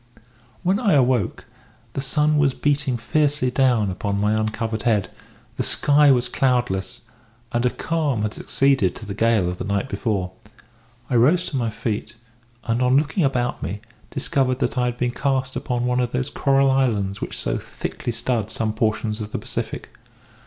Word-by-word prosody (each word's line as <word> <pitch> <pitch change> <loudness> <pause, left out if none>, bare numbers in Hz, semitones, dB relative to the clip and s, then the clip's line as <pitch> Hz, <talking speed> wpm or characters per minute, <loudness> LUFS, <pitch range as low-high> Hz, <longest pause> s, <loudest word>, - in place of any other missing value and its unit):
"When 190 +3 +2
I 210 -8 +2
awoke 125 -7 +2 0.5
the 135 - -2
sun 150 +2 +2
was 140 -3 +2
beating 140 -3 0
fiercely 145 +2 +1
down 125 -6 +2
upon 100 +2 -2
my 105 +1 +2
uncovered 110 +1 -1
head; 105 -5 +1 0.5
the - - 0
sky 145 0 +4
was 125 -2 +3
cloudless; 125 -8 0 0.5
and 120 +1 +1
a - - +3
calm 145 -7 -1
had 110 0 -1
succeeded 135 -9 +1
to 110 - -8
the 100 - -5
gale 110 -3 +2
of 90 0 -4
the - - -2
night 100 +5 -1
before. 100 -8 -2 0.8
I 125 - +1
rose 155 +10 +4
to - - -6
my 120 -3 0
feet, 110 0 -4 0.5
and 115 +2 0
on 125 +1 +4
looking 150 +5 +1
about 125 -3 0
me, 105 +4 -4 0.3
discovered 135 -2 0
that - - -1
I 125 -1 +1
had 120 0 -2
been 125 0 0
cast 130 0 -1
upon 120 -1 -2
one 125 0 +1
of 120 -1 -1
those 125 +1 -1
coral 135 -1 +3
islands 105 -7 0
which - - -4
so - - -1
thickly 120 - -5
stud 115 -2 -1
some 110 -1 -1
portions 110 0 -1
of 105 0 -6
the - - -2
Pacific. - - -5
125 Hz, 175 wpm, -22 LUFS, 110-135 Hz, 0.8 s, sky